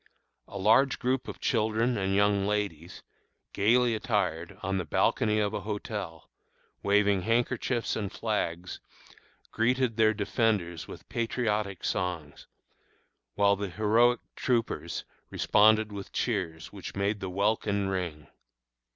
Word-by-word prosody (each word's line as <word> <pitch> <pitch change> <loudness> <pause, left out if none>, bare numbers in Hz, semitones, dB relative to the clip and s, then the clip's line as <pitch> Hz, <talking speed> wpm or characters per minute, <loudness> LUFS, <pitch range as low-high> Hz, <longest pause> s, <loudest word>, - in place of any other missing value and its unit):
A 100 - -8
large 115 +8 +4
group 130 0 -1
of - - -7
children 115 +1 +1
and 95 -2 0
young 100 -1 +3
ladies, 100 -6 -3 0.5
gayly 120 +4 +3
attired, 95 -6 -1
on 95 -1 -1
the - - -1
balcony 105 +6 +1
of 105 0 0
a 105 - -2
hotel, 105 -5 -5 0.5
waving 100 -1 +3
handkerchiefs 115 +2 0
and 100 -3 -3
flags, 90 -6 -3 0.7
greeted 120 0 +1
their 110 -1 +4
defenders 100 -6 0
with - - -11
patriotic 105 -5 -2
songs, 85 -5 -3 0.9
while 100 0 +4
the 100 0 -4
heroic 110 +5 +3
troopers 120 -3 -1 0.2
responded 110 0 +4
with 100 -1 -7
cheers 85 -9 -2
which - - -8
made 100 +1 0
the 95 - -4
welkin 100 +1 0
ring. 90 -6 -3
105 Hz, 120 wpm, -28 LUFS, 95-110 Hz, 0.9 s, large